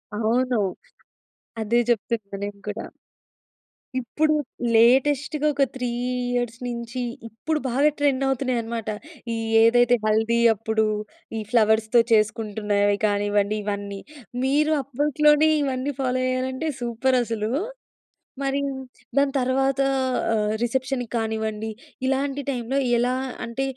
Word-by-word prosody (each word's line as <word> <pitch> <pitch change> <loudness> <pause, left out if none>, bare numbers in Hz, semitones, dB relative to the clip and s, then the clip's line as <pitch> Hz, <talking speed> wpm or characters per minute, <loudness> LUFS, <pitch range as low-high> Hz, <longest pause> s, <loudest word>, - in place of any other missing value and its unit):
అవును. 235 +2 +1 1.0
అదే 230 +2 +2
చెప్తున్నా 220 -3 -1
నేను 205 0 -7
కూడా. 220 +2 -5 1.1
ఇప్పుడు 305 +6 +1 0.4
లేటెస్ట్‌గా 275 +5 +3
ఒక 275 - +2
3 250 -2 -2 0.5
ఇయర్స్ 240 -1 -2
నుంచి 235 +1 -4 0.3
ఇప్పుడు 305 +8 -2
బాగా 275 +5 +3
ట్రెండ్ 275 -2 +2
అవుతున్నాయన్నమాట. 235 -4 -1 0.4
ఈ - - -1 0.3
ఏదైతే 245 +1 +5
హల్దీ 220 +2 +2 0.2
అప్పుడు 220 +1 0 0.5
ఈ - - -3
ఫ్లవర్స్‌తో 220 0 +4
చేసుకుంటున్నవి 210 -2 +1
కానివ్వండి 205 0 +1
ఇవన్నీ. 200 -1 -4 0.4
మీరు 300 +3 +2
అప్పట్లోనే 295 +3 +3
ఇవన్నీ 270 +1 -2
ఫాలో 255 0 0
అయ్యాలంటే 260 +4 -1
సూపర్ 240 +2 +1
అసలు! 220 -1 -2 0.9
మరి 275 0 0 0.6
దాని 280 -1 +3
తర్వాత 270 +1 +1 0.5
ఆహ్, 210 -1 +1
రిసెప్షన్‌కి 250 0 -1
కానివ్వండి, 220 -1 -2 0.4
ఇలాంటి 275 +1 0
టైంలో 255 0 -2 0.2
ఎలా 245 +1 +2 0.3
అంటే 235 +3 -3
240 Hz, 105 wpm, -24 LUFS, 220-270 Hz, 1.1 s, ఏదైతే